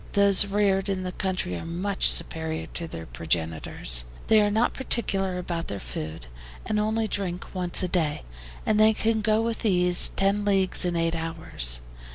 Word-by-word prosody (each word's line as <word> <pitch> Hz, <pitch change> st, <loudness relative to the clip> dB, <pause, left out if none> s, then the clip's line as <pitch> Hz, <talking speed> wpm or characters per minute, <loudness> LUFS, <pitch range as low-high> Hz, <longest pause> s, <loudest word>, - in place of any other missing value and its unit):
Those 200 Hz, -1 st, +4 dB
reared 200 Hz, -1 st, +1 dB
in 190 Hz, -1 st, -2 dB
the 180 Hz, -, -4 dB
country 185 Hz, -, -2 dB
are 85 Hz, -, -6 dB
much 185 Hz, +4 st, +1 dB
superior 160 Hz, -1 st, 0 dB
to 170 Hz, -, -5 dB
their 80 Hz, -, -8 dB
progenitors. 80 Hz, -4 st, 0 dB, 0.2 s
They 220 Hz, -1 st, +6 dB
are 205 Hz, -, +2 dB
not 220 Hz, +4 st, +1 dB
particular 195 Hz, -8 st, 0 dB
about 170 Hz, -2 st, -4 dB
their 100 Hz, -, -5 dB
food, 75 Hz, +4 st, -6 dB, 0.4 s
and 210 Hz, -, 0 dB
only 220 Hz, +1 st, 0 dB
drink 185 Hz, -3 st, -4 dB
once 180 Hz, -1 st, +2 dB
a -, -, +1 dB
day, 160 Hz, -5 st, -1 dB, 0.4 s
and 215 Hz, -1 st, +2 dB
they 215 Hz, +1 st, +6 dB
can 220 Hz, 0 st, 0 dB
go 215 Hz, +1 st, +2 dB
with 230 Hz, 0 st, -3 dB
ease 180 Hz, -4 st, +3 dB
ten 200 Hz, +1 st, +1 dB
leagues 195 Hz, -3 st, +2 dB
in 175 Hz, -1 st, -1 dB
eight 165 Hz, 0 st, 0 dB
hours. 160 Hz, -, -2 dB
185 Hz, 175 wpm, -25 LUFS, 160-205 Hz, 0.4 s, They